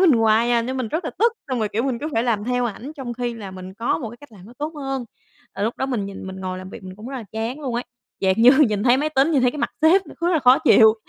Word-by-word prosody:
mình 365 Hz, -5 st, +6 dB
hoài 225 Hz, 0 st, +3 dB
à 235 Hz, -1 st, +3 dB
nên 260 Hz, +3 st, -3 dB
mình 255 Hz, -4 st, -2 dB
rất 320 Hz, +9 st, -2 dB
là -, -, -2 dB
tức. 460 Hz, +3 st, +4 dB, 0.2 s
Xong 255 Hz, -2 st, -1 dB
rồi, 215 Hz, -2 st, 0 dB
kiểu, 220 Hz, +3 st, -1 dB
mình 260 Hz, -3 st, -1 dB
cứ 300 Hz, -, -4 dB
phải 225 Hz, -, +1 dB
làm 225 Hz, -4 st, 0 dB
theo 245 Hz, +1 st, 0 dB
ảnh 240 Hz, +6 st, -5 dB
trong 260 Hz, -4 st, -5 dB
khi 240 Hz, -1 st, -3 dB
là 205 Hz, -4 st, -8 dB
mình 185 Hz, 0 st, -9 dB
có 230 Hz, +3 st, -1 dB
một 245 Hz, -8 st, -5 dB
cái 235 Hz, -, -12 dB
cách 290 Hz, -5 st, -15 dB
làm 190 Hz, -3 st, -14 dB
nó 235 Hz, -, -13 dB
tốt 300 Hz, +2 st, -3 dB
hơn, 270 Hz, -3 st, -4 dB, 0.5 s
là 200 Hz, -, -4 dB
lúc 225 Hz, +3 st, -1 dB
đó 265 Hz, -, -1 dB
mình 230 Hz, -7 st, -2 dB
nhìn, 195 Hz, -1 st, -8 dB
mình 190 Hz, 0 st, -7 dB
ngồi 185 Hz, -1 st, -4 dB
làm 185 Hz, +1 st, -9 dB
việc -, -, -10 dB
mình 185 Hz, 0 st, -9 dB
cũng 215 Hz, +4 st, -9 dB
rất 270 Hz, -, -5 dB
là 240 Hz, -, -6 dB
chán 225 Hz, +6 st, -3 dB
luôn 260 Hz, -5 st, -3 dB
ấy. 240 Hz, +1 st, -2 dB, 0.4 s
Dạng 190 Hz, -1 st, +3 dB
như, 235 Hz, +2 st, +7 dB, 0.2 s
nhìn 205 Hz, -1 st, -1 dB
thấy 245 Hz, +1 st, +5 dB
máy 295 Hz, +3 st, 0 dB
tính, 285 Hz, 0 st, +2 dB
nhìn 275 Hz, -4 st, +3 dB
thấy 250 Hz, -, +4 dB
cái 295 Hz, -, -8 dB
mặt -, -, -1 dB
sếp, 365 Hz, +5 st, +5 dB
nó -, -, -12 dB
cứ 345 Hz, -, +1 dB
là 325 Hz, -, +3 dB
khó 255 Hz, -2 st, +6 dB
chịu, 220 Hz, -8 st, +6 dB
240 Hz, 330 wpm, -22 LUFS, 215-270 Hz, 0.5 s, như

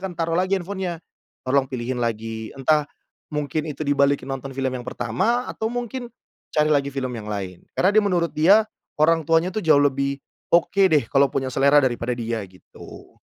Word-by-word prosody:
akan 190 Hz, -2 st, -4 dB
taruh 165 Hz, 0 st, -1 dB
lagi 185 Hz, +3 st, +1 dB
handphone-nya, 180 Hz, -2 st, -4 dB, 0.5 s
"tolong 130 Hz, +1 st, +1 dB
pilihin 125 Hz, 0 st, -3 dB
lagi" 110 Hz, -1 st, -3 dB
entah 150 Hz, +2 st, +2 dB, 0.4 s
mungkin 150 Hz, +1 st, -2 dB
itu 150 Hz, +1 st, -5 dB
dibalikin 140 Hz, 0 st, +2 dB
nonton 135 Hz, 0 st, -5 dB
film 135 Hz, -1 st, -1 dB
yang 125 Hz, -1 st, -5 dB
pertama, 225 Hz, -, -1 dB
atau 220 Hz, -, -3 dB
mungkin 245 Hz, +1 st, -4 dB, 0.5 s
cari 150 Hz, 0 st, +3 dB
lagi 140 Hz, -1 st, +2 dB
film 135 Hz, -2 st, -4 dB
yang 110 Hz, -3 st, -7 dB
lain. 95 Hz, -4 st, -5 dB, 0.2 s
Karena 185 Hz, -, +4 dB
dia 215 Hz, -, +5 dB
menurut 175 Hz, -4 st, 0 dB
dia, 195 Hz, +8 st, +5 dB, 0.3 s
orang 160 Hz, +1 st, +3 dB
tuanya 165 Hz, +3 st, +3 dB
tuh 215 Hz, -, -2 dB
jauh 155 Hz, -5 st, +4 dB
lebih 140 Hz, -1 st, +1 dB, 0.3 s
oke 175 Hz, +3 st, +3 dB
deh, 150 Hz, -7 st, +3 dB
kalau 140 Hz, 0 st, +4 dB
punya 130 Hz, 0 st, -3 dB
selera 140 Hz, +2 st, +4 dB
daripada 120 Hz, -1 st, -1 dB
dia 115 Hz, -1 st, -3 dB
gitu. 90 Hz, 0 st, -14 dB
145 Hz, 175 wpm, -23 LUFS, 130-170 Hz, 0.5 s, dia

